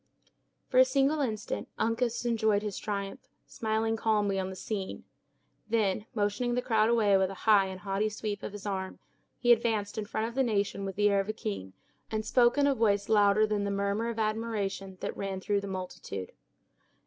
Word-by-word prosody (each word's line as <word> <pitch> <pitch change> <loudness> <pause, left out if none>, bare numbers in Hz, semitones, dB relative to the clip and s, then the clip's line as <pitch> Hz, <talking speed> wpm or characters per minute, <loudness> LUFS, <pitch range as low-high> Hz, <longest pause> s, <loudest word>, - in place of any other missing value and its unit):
For 255 - +3
a - - +10
single 275 +3 +2
instant 215 -6 -3
Uncas 235 +1 0
enjoyed 220 -3 +2
his 210 -3 -3
triumph, 200 +2 -4 0.3
smiling 220 0 -1
calmly 210 -3 +1
on 190 0 -2
the 190 - -7
scene. 195 0 -4 0.7
Then 215 -1 +1
motioning 225 +4 0
the 250 - +1
crowd 220 -2 +3
away 215 -4 +4
with 190 -1 +2
a 195 - -7
high 205 -3 +6
and 190 -1 -7
haughty 200 +2 0
sweep 210 -1 -4
of - - -5
his 205 0 -9
arm, 190 -2 -3 0.4
he 240 - +3
advanced 220 -3 +2
in 210 - -3
front 220 +2 -2
of 235 - -7
the 270 - +1
nation 200 -4 0
with 195 -1 -4
the 205 0 +3
air 200 - +3
of 195 +2 -2
a - - 0
king, 95 - -5 0.4
and 215 0 -2
spoke 240 +3 +4
in 285 - +4
a 285 - +4
voice 205 -5 +1
louder 210 0 +5
than 210 -1 -1
the 200 - -1
murmur 200 +3 0
of 230 - -4
admiration 215 -3 -2
that - - -3
ran 195 -1 -3
through 200 +1 0
the 200 - -6
multitude. 185 - -6
210 Hz, 195 wpm, -30 LUFS, 200-225 Hz, 0.7 s, a